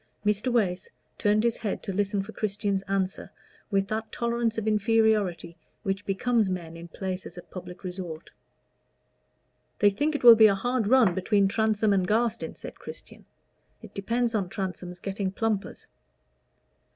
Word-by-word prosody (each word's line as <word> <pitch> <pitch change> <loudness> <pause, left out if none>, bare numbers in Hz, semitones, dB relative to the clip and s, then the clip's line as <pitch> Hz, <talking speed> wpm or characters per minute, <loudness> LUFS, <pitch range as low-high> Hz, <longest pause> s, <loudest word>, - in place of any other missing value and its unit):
Mr. 210 +4 +1
Wace 190 -6 0 0.3
turned 210 +1 +2
his 235 -1 +1
head 210 - -3
to 195 - -4
listen 200 0 0
for 215 - -9
Christian's 205 -2 -1
answer 195 -1 -2 0.4
with 195 -1 +1
that 220 0 -3
tolerance 235 -1 -1
of 220 -1 -2
inferiority 215 -5 +2 0.3
which 195 -1 -3
becomes 215 +2 +1
men 170 -3 -5
in 170 +1 -9
places 185 +1 -6
of 175 - -12
public 180 0 -9
resort. 180 -3 -7 1.5
"They 205 -1 +4
think 295 +9 -1
it 290 - -3
will 240 -1 +11
be 220 -1 +7
a 200 - +3
hard 245 +2 -1
run 235 -6 +5
between 195 +2 +2
Transome 215 0 +1
and 185 -2 +1
Garstin," 230 +2 0
said - - -10
Christian. - - -11 0.6
"It - - -12
depends 235 +4 -1
on 200 -5 -1
Transome's 180 -3 -5
getting 195 0 -3
plumpers." 215 0 -2
205 Hz, 150 wpm, -27 LUFS, 190-225 Hz, 1.5 s, will